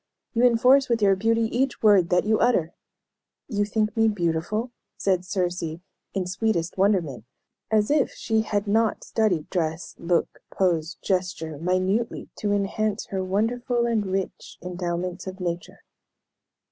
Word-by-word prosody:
You 235 0 +2
enforce 250 +3 +5
with 235 -1 +2
your 195 -1 +5
beauty 225 +3 +1
each 260 -1 0
word 200 -5 +5
that 180 0 +3
you 215 0 +2
utter!" 185 -9 +2 0.7
"You 205 -4 0
think 215 +1 -1
me 225 -1 +4
beautiful?" 205 +4 -1 0.3
said 185 -2 +1
Circe, 180 -1 -1 0.5
in 190 -2 0
sweetest 180 -2 -1
wonderment, 185 - +1 0.5
as 215 +2 +2
if 295 -3 +3
she 220 -2 0
had 205 -1 -1
not 220 +2 +1
studied 195 -9 0
dress, 165 -2 -2
look, 170 0 0
pose, 170 -3 0
gesture, 180 -5 -2
minutely 185 +7 0
to 205 - -1
enhance 205 +1 0
her 190 -1 -1
wonderful 235 +5 0
and 225 -4 0
rich 190 0 -4
endowments 180 0 -3
of 190 +1 -6
nature. 175 -1 -4
195 Hz, 140 wpm, -25 LUFS, 180-220 Hz, 0.7 s, enforce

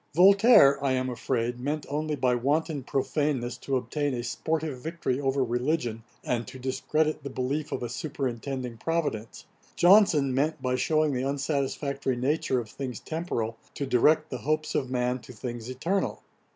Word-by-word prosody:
Voltaire, 190 - +7
I 135 -2 +2
am 130 0 0
afraid, 120 0 -2
meant 145 +3 -2
only 150 +1 -2
by 130 -3 +2
wanton 145 +4 0
profaneness 135 -1 -1
to 135 - -2
obtain 135 +3 -2
a 120 - -3
sportive 155 +2 -2
victory 155 -3 -2
over 135 0 +1
religion, 120 -1 -1 0.2
and 120 -1 -1
to - - -9
discredit 150 +4 -1
the 140 - -6
belief 135 +4 -2
of - - -3
a - - -1
superintending 130 -2 -4
Providence: 150 -10 -2 0.3
Johnson 175 -8 +5
meant, 150 +5 0
by 125 0 -1
shewing 155 +3 +2
the 125 - -1
unsatisfactory 140 -1 -1
nature 130 +1 0
of 115 - -5
things 130 -4 -5
temporal, 120 -9 -3 0.2
to 140 - -2
direct 155 +5 +3
the 130 - -3
hopes 155 +5 -1
of 130 - -1
man 125 0 0
to 125 - -12
things 120 +1 -6
eternal. 165 +10 -2
135 Hz, 160 wpm, -27 LUFS, 125-155 Hz, 0.3 s, Voltaire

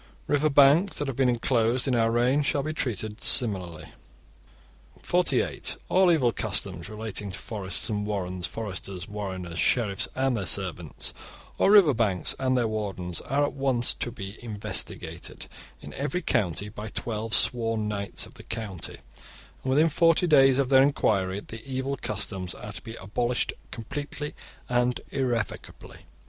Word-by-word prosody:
River 150 +1 +2
banks 145 +7 +5
that 145 - -1
have 135 - -3
been 130 -1 +3
enclosed 120 +1 +1
in 130 - +1
our 115 -1 +3
reign 125 +5 +2
shall 140 0 0
be 155 +2 -3
treated 110 -6 -3
similarly. 90 -9 +2 1.1
(48) - - +1
All 185 -1 +5
evil 130 -8 +3
customs 100 -5 -2
relating 105 -1 -5
to 95 - -6
forests 100 -1 -1
and 105 -3 -2
warrens, 95 -4 -2
foresters, 95 -4 -4
warreners, 95 -4 -5
sheriffs 105 -6 +1
and 130 -1 +1
their 100 -5 -2
servants, - - 0 0.5
or - - +4
river 200 -8 +7
banks 105 -6 +1
and 130 -1 +1
their 120 -2 +2
wardens, 95 -5 -3
are 140 +2 0
at - - -4
once 135 -3 +2
to 120 - -3
be 100 0 -8
investigated 105 -3 -4 0.4
in - - -9
every 160 +6 -2
county 100 - 0
by 105 +1 -7
twelve 110 +1 -2
sworn 115 -3 +2
knights 100 -1 -2
of - - -15
the - - -12
county, 105 -7 -4 0.7
and 130 - -4
within 150 +5 +4
forty 165 +2 +3
days 135 -5 +6
of 135 -2 +1
their 135 -1 +7
enquiry 100 -8 +1
the 110 +1 -10
evil 135 +1 -3
customs 95 -6 -3
are - - -8
to - - -6
be 115 - -8
abolished 120 +6 -1 0.2
completely 145 +5 -5 0.3
and 125 0 +1
irrevocably. 120 -5 -3
115 Hz, 155 wpm, -27 LUFS, 100-135 Hz, 1.1 s, river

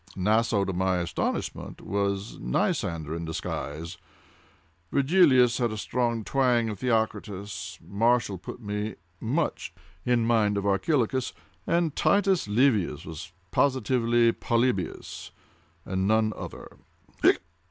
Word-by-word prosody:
Naso, 105 +1 +2
to 95 - -2
my 95 +1 +1
astonishment, 85 -1 -3
was 100 0 -2
Nicander 80 +5 -1
in 85 - -4
disguise. 80 +1 -5 0.9
Virgilius 135 -5 +4
had 120 -2 +1
a 110 - -4
strong 115 0 -1
twang 125 -2 +2
of 105 -3 -5
Theocritus. 105 -4 -2
Martial 115 -2 +1
put 95 - -8
me 105 -1 -3 0.2
much 145 +8 -1 0.3
in 120 -2 +2
mind 110 -3 +2
of 100 - -2
Archilochus—and 125 - 0
Titus 195 - +2
Livius 105 - +2
was 80 +1 -8 0.2
positively 120 -3 +3
Polybius 115 -7 -1 0.6
and 95 +1 -1
none 110 0 +3
other." - - -9
110 Hz, 105 wpm, -27 LUFS, 95-125 Hz, 0.9 s, Virgilius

